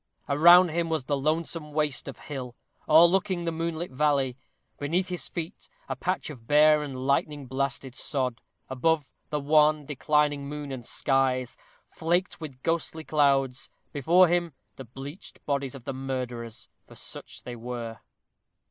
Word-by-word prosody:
Around 175 +5 +7
him 165 +1 -1
was 160 -4 0
the 145 +2 0
lonesome 155 +1 -2
waste 150 -4 0
of - - -7
hill, 130 -4 -7 0.3
o'erlooking 175 +3 +5
the 165 - 0
moonlit 165 0 -3
valley: 135 -2 +1 0.4
beneath 175 +6 0
his 180 -1 -3
feet, 170 +2 -6 0.2
a - - -3
patch - - -2
of 115 -5 -13
bare 150 +1 +6
and 130 -3 -5
lightning 140 +1 0
blasted 135 0 -2
sod: 125 -3 -2 0.3
above, 145 +3 0 0.2
the 150 - -1
wan, 150 +1 +4
declining 145 0 +1
moon 145 -1 -6
and 125 -3 -7
skies, 130 -2 0 0.3
flaked 175 +2 -1
with 135 -5 -8
ghostly 165 -1 -1
clouds; 135 -4 +1 0.2
before 170 +6 +5
him, 170 -2 0 0.2
the 135 - -9
bleached 135 - -10
bodies 140 -2 -1
of 130 - -10
the 135 - -3
murderers, 125 -3 -5 0.2
for - - -14
such - - -7
they 120 0 -6
were. 115 -1 -6
145 Hz, 150 wpm, -27 LUFS, 130-160 Hz, 0.4 s, Around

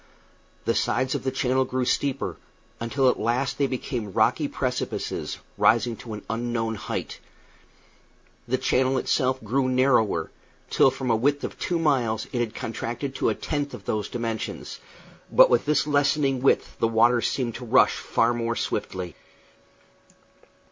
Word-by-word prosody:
The - - +2
sides 130 +1 0
of - - -3
the 130 - 0
channel 130 0 +1
grew 130 0 -2
steeper, 140 +1 -1 0.4
until 130 +4 +1
at 125 - +2
last 125 +5 0
they 140 - +3
became 120 -5 -4
rocky - - +2
precipices, - - -3 0.2
rising 115 +1 +3
to 110 0 -7
an 105 - -9
unknown 115 -1 -2
height. 105 - -5 1.3
The 130 +2 +1
channel 130 +1 +1
itself 130 0 0
grew 130 +4 +1
narrower, 125 -10 +2 0.4
till - - +5
from 130 -1 -2
a - - +4
width 140 +5 +1
of - - -5
two 175 - 0
miles 125 -9 +1
it 125 - 0
had 115 -2 -2
contracted 120 +4 -4
to - - +2
a - - 0
tenth 145 -2 -3
of - - -13
those 105 -2 -2
dimensions; 115 -2 -4 0.5
but - - +7
with - - +3
this 150 -2 +2
lessening 140 -2 +2
width 135 - +2
the 115 - +3
waters 115 +1 +3
seemed 125 -4 -2
to 125 - -8
rush 115 - +4
far 115 +1 +1
more 115 0 -1
swiftly. 90 -6 -3
125 Hz, 155 wpm, -25 LUFS, 115-135 Hz, 1.3 s, but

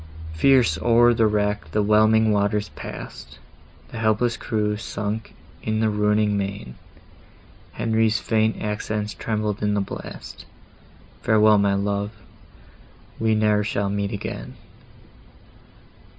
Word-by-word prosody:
Fierce 120 -1 +3
o'er 120 0 +5
the 115 -1 +3
wreck 105 0 -1
the 105 - +2
whelming 110 +1 +4
waters 105 0 0
pass'd, - - -9 0.5
The - - -7
helpless 115 +2 +1
crew 105 -2 -1
sunk 105 +1 -5 0.3
in 110 0 -1
the 110 -1 +2
roaring 105 0 +1
main! 100 -9 -4 1.0
Henry's 110 -1 +1
faint 110 0 0
accents 105 0 -3
trembled 105 -2 -3
in 105 0 +1
the - - +1
blast— 100 - -7 0.8
"Farewell, 110 -1 +4
my 100 -1 +2
love!—we 100 - -5
ne'er 105 -1 +2
shall 100 -1 -1
meet 100 0 -2
again!" 100 - -6
105 Hz, 110 wpm, -23 LUFS, 105-110 Hz, 1.0 s, o'er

